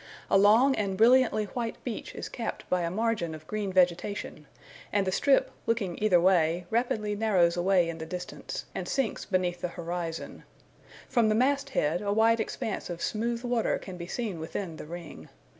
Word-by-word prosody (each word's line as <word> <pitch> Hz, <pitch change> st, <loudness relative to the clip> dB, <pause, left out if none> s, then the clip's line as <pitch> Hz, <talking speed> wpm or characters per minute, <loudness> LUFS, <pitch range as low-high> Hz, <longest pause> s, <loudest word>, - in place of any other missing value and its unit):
A -, -, +6 dB
long 225 Hz, +7 st, +6 dB
and 195 Hz, -2 st, -1 dB
brilliantly 235 Hz, -1 st, +5 dB
white 230 Hz, +2 st, -4 dB
beach 235 Hz, -4 st, -5 dB
is -, -, -5 dB
capped 230 Hz, -, -5 dB
by 180 Hz, -1 st, +2 dB
a 170 Hz, -, -1 dB
margin 210 Hz, -4 st, -1 dB
of 155 Hz, 0 st, -12 dB
green 205 Hz, +2 st, -3 dB
vegetation; 180 Hz, -3 st, 0 dB, 0.4 s
and 200 Hz, -1 st, +2 dB
the 185 Hz, -, 0 dB
strip, 275 Hz, +7 st, +3 dB, 0.2 s
looking 205 Hz, -7 st, -1 dB
either 200 Hz, -5 st, +5 dB
way, 175 Hz, -1 st, +3 dB
rapidly 220 Hz, -3 st, 0 dB
narrows 190 Hz, -6 st, +3 dB
away 180 Hz, 0 st, +3 dB
in 165 Hz, -1 st, -5 dB
the 160 Hz, -, -6 dB
distance, 180 Hz, +1 st, -6 dB
and -, -, -4 dB
sinks 270 Hz, -5 st, -1 dB
beneath 180 Hz, -2 st, -1 dB
the -, -, -1 dB
horizon 170 Hz, -1 st, -5 dB, 0.6 s
From 230 Hz, -4 st, +3 dB
the 215 Hz, -, +2 dB
mast 275 Hz, +4 st, +2 dB
head 170 Hz, -, 0 dB
a 200 Hz, -1 st, -1 dB
wide 225 Hz, +2 st, +4 dB
expanse 220 Hz, -2 st, -3 dB
of 175 Hz, -1 st, -5 dB
smooth 230 Hz, +2 st, -1 dB
water 240 Hz, -2 st, +1 dB
can 185 Hz, -2 st, -9 dB
be 170 Hz, 0 st, -7 dB
seen 210 Hz, -5 st, -3 dB
within 165 Hz, +1 st, -5 dB
the -, -, -9 dB
ring. 170 Hz, 0 st, -9 dB
195 Hz, 180 wpm, -28 LUFS, 175-225 Hz, 0.6 s, A